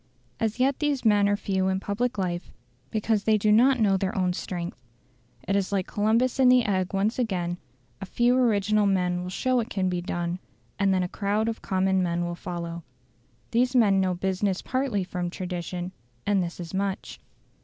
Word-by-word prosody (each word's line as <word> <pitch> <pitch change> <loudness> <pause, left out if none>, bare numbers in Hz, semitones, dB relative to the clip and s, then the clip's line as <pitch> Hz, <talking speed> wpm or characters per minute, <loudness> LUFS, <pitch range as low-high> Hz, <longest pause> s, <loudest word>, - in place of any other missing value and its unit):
As 225 +1 -1
yet 265 +1 +2
these 290 -4 0
men 205 -2 +4
are 205 - +3
few 190 -2 0
in 190 0 +1
public 220 +5 -2
life, 175 -2 -3 0.4
because 215 -1 0
they 220 -1 +4
do 210 +1 +2
not 250 +4 +5
know 200 -3 +3
their 190 +1 -2
own 180 -1 +1
strength. 175 -3 -5 0.7
It 195 - +1
is 200 -1 0
like 195 -2 0
Columbus 230 +5 +1
and 255 -1 +6
the 250 -1 +5
egg 185 -3 0
once 205 +5 0
again; 180 -7 -1 0.4
a 195 - -5
few 240 +5 +2
original 215 -4 +3
men 180 -2 +1
will 180 - -5
show 255 +7 +1
it 230 0 -3
can 185 -5 0
be 180 -1 -2
done, 175 0 -3 0.4
and 200 -1 +3
then 185 -1 +2
a - - -1
crowd 205 +3 -1
of 225 -1 -3
common 190 -1 +1
men 175 -1 0
will 175 - -3
follow. 170 -1 -5 0.7
These 250 +3 +2
men 200 -5 +5
know 185 -1 +1
business 190 +1 -1
partly 255 -7 -1
from 180 -1 -3
tradition, 180 0 -5 0.3
and 200 -2 +2
this 175 0 -5
is 170 0 -7
much. 195 0 -3
195 Hz, 190 wpm, -26 LUFS, 180-220 Hz, 0.7 s, and